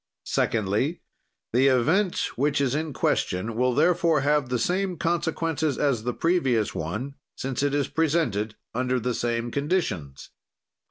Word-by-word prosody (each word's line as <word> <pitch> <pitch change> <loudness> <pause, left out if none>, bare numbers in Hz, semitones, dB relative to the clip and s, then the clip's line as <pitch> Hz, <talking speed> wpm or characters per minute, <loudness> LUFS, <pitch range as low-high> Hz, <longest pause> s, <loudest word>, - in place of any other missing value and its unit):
"Secondly, 110 - 0 0.5
the 130 +3 +4
event 160 - +2
which 145 +3 +1
is 135 -2 +1
in 155 +1 -1
question 110 -4 -1
will 125 +1 +1
therefore 165 -3 +3
have 145 -1 +1
the 125 - +1
same 180 +8 0
consequences 160 -3 -1
as 130 -7 0
the 125 - +1
previous 135 - +1
one, 110 - -4 0.2
since 130 -1 -3
it 145 0 +1
is 140 -2 +1
presented 140 -11 0 0.2
under 125 +1 0
the 125 +1 -1
same 120 0 -1
conditions. 140 - -2
135 Hz, 140 wpm, -25 LUFS, 120-160 Hz, 0.5 s, the